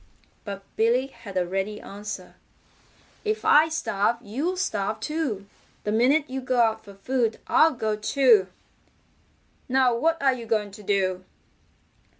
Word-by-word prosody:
But 200 -1 -6
Billy 235 +4 +2
had 205 -8 -9
a 180 - +2
ready 195 +3 -3
answer. 205 +2 -8 0.9
"If 430 0 -2
I 310 +2 +6
starve 235 -9 0
you'll 270 - -3
starve 215 - -1
too. 260 -7 -3 0.4
The 210 - -1
minute 270 +7 +3
you 265 +1 -4
go 255 -1 0
out 225 -1 +2
for 200 -1 -13
food, 230 +2 -1
I'll 315 -3 +4
go 220 -2 -1
too. 220 -2 +4 1.2
Now 255 -1 +3
what 325 +7 +1
are 270 -1 +3
you 235 -2 -7
going 215 -2 0
to 210 +2 -12
do?" 190 -2 0
225 Hz, 145 wpm, -25 LUFS, 205-265 Hz, 1.2 s, I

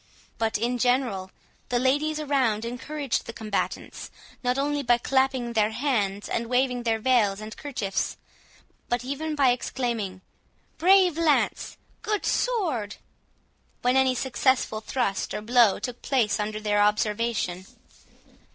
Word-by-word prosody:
But, 225 -2 +1
in 240 +3 -1
general, 245 -7 +1 0.4
the 245 - +1
ladies 290 +5 +1
around 260 -7 +1
encouraged 265 +3 -3
the 230 - -6
combatants, 215 -3 -4 0.3
not 250 +1 +1
only 290 +1 0
by 240 -3 +3
clapping 265 -1 0
their 215 -2 +3
hands 220 -5 -1
and 230 0 -2
waving 250 0 +1
their 225 -2 +1
veils 220 -4 +2
and 215 0 -8
kerchiefs, 225 -9 -3 0.7
but 240 0 -1
even 300 +3 -3
by 275 -4 +4
exclaiming, 235 -6 -3 0.6
"Brave 365 -1 +5
lance! 315 -3 +1 0.2
Good 425 -2 -2
sword!" 320 - 0 0.9
when 250 +1 +3
any 265 -1 +3
successful 260 -3 +1
thrust 220 -4 -2
or - - -3
blow 235 -2 +4
took 245 -1 -6
place 245 -7 +1
under 215 0 -2
their 210 -1 +1
observation. 210 -3 0
245 Hz, 130 wpm, -26 LUFS, 215-270 Hz, 0.9 s, Brave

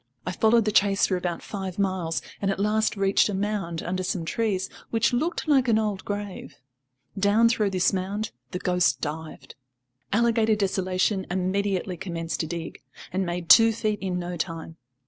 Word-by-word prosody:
I - - -2
followed 220 +4 +3
the 215 - +1
chase 200 -1 +3
for 190 - 0
about 175 -2 -3
five 190 -3 -5
miles, 185 -4 -1 0.2
and 195 - +1
at 195 - -1
last 215 +1 +1
reached 195 +1 +3
a 205 - -2
mound 195 -5 -2
under 185 +1 -2
some 180 -2 -2
trees, 200 -1 -1 0.2
which 230 +2 +1
looked 315 +7 -1
like 270 -4 +4
an 225 -2 +4
old 210 -3 -1
grave. 205 -7 -5 0.6
Down 205 +3 +4
through 220 -3 +1
this 185 -1 +1
mound 195 +3 -2 0.2
the 180 - -4
ghost 180 -1 +1
dived. 155 -4 -6 0.6
Alligator 225 0 +3
Desolation 190 -1 0
immediately 190 0 -1
commenced 165 -3 -4
to 160 - -1
dig, 170 -2 -6 0.3
and 190 0 0
made 175 0 -3
two 225 +4 +8
feet 215 -2 -1
in 185 -2 -2
no 175 0 -4
time. 165 0 -5
195 Hz, 170 wpm, -25 LUFS, 180-215 Hz, 0.6 s, two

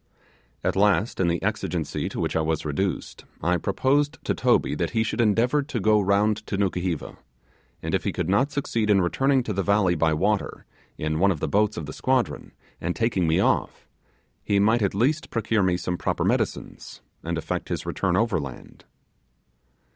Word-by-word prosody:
At - - 0
last, 105 +2 +2
in 95 - +2
the 85 0 +1
exigency 95 -5 -2
to - - -6
which - - -1
I 80 - +2
was 80 0 -1
reduced, 85 +5 -3 0.2
I 90 +2 +2
proposed 135 - +1
to - - 0
Toby - - +2
that - - -1
he 110 - +4
should 115 - -1
endeavour 120 +6 +2
to 140 -4 -4
go 110 +1 +4
round 100 +2 +2
to 100 - -2
Nukuheva, 90 -4 -2 0.7
and - - -3
if - - +1
he - - -1
could - - -3
not 125 +10 +2
succeed 115 -6 -1
in 100 -2 +5
returning 135 +8 +2
to 110 - -3
the 100 - 0
valley 100 -2 +2
by 80 -1 +2
water, 105 +6 -1 0.3
in 80 0 -2
one 100 +3 +4
of 90 -6 -1
the - - -2
boats 105 +1 +1
of 80 - -4
the 75 - -7
squadron, 130 -2 -1 0.3
and 85 +1 -2
taking 115 -7 +1
me 80 - +2
off, - - 0 0.6
he 100 - +1
might 110 +4 +3
at 100 -2 0
least 140 +9 +1
procure 110 -1 0
me 90 -2 +2
some 90 0 -3
proper - - -1
medicines, - - -2 0.2
and 85 0 -2
effect 80 - -4
his - - -3
return 90 -2 0
overland. 85 - -3
100 Hz, 185 wpm, -25 LUFS, 90-115 Hz, 0.7 s, in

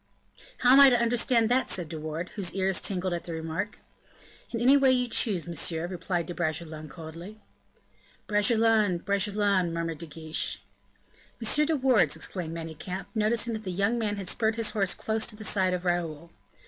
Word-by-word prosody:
"How 250 - +5
am 275 - +8
I 280 -1 +10
to 245 -2 +3
understand 235 0 +2
that?" 255 +2 +2
said 175 -3 -3
De 160 0 -6
Wardes, 155 +3 -5
whose 195 -4 -2
ears 190 -1 +1
tingled 185 -2 0
at 170 -1 -4
the 170 - -5
remark. 160 +5 -4 0.7
"In 230 - -3
any 255 +4 +5
way 270 -2 +5
you 250 -1 +2
chose, 205 -7 +1
monsieur," 165 0 -2
replied 175 -1 -3
De 175 - -6
Bragelonne, 160 -2 -4
coldly. 170 +7 -10 0.9
"Bragelonne, 215 -2 +3
Bragelonne," 200 -1 +1
murmured 165 -1 -3
De 170 - -5
Guiche. 155 +1 -3 0.8
"M. 255 +6 +2
de 320 - +2
Wardes," 260 -5 +3
exclaimed 165 -3 -3
Manicamp, 170 +4 -6
noticing 225 +1 +1
that 220 0 -5
the 185 - -4
young 200 +6 0
man 210 -2 -1
had 195 -2 -6
spurred 220 +2 0
his 230 -2 -2
horse 195 -4 0
close 220 0 -2
to 220 - -7
the 215 - -9
side 190 -2 +1
of 180 0 -6
Raoul. 170 -2 -2
195 Hz, 180 wpm, -28 LUFS, 170-225 Hz, 0.9 s, I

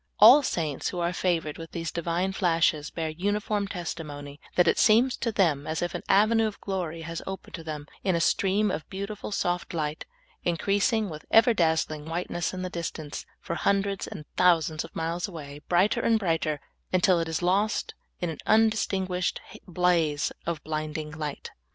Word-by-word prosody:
All 245 +8 +10
saints 155 - -2
who - - -6
are 175 0 0
favored 165 -4 -1
with 165 0 -9
these 165 -1 -3
Divine 170 +3 -1
flashes 165 -5 +2
bear 160 -1 -3
uniform 205 +4 -1
testimony 150 -6 -6 0.2
that 180 -1 +4
it - - +3
seems 235 +4 +5
to 230 - -1
them 160 -8 +1
as 160 +2 -1
if 175 - -2
an - - -3
avenue 220 +3 +4
of 210 - -7
glory 170 -5 -4
was 165 0 -4
opened 190 0 -7
to 165 - -6
them 150 -2 -5 0.2
in 190 -3 +2
a - - +1
stream 195 +4 +2
of 155 -1 -5
beautiful, 200 +2 -5
soft 175 -3 -1
light, 155 -1 -2 0.4
increasing 200 +6 +1
with 155 -4 -8
ever 230 +2 +6
dazzling 160 -4 +1
whiteness 175 +1 -2
in 185 0 -5
the 185 - -3
distance, 160 -3 -5
for - - -5
hundreds 200 +2 0
and 150 - -8
thousands 165 -3 +3
of - - -12
miles 165 +3 -2
awa^^, 150 -5 -9
brighter 190 +7 +3
and 230 -1 +3
brighter, 165 -6 0 0.3
until 185 -1 +4
it 165 - -1
is 160 +2 -2
lost 200 +5 +1 0.3
in 175 -2 -1
an 160 - -8
undistinguished 200 -4 +2 0.3
blaze 170 -4 +1 0.2
of 165 -4 -2
blinding 155 0 -3
light. 150 -2 -5
175 Hz, 175 wpm, -27 LUFS, 160-195 Hz, 0.4 s, All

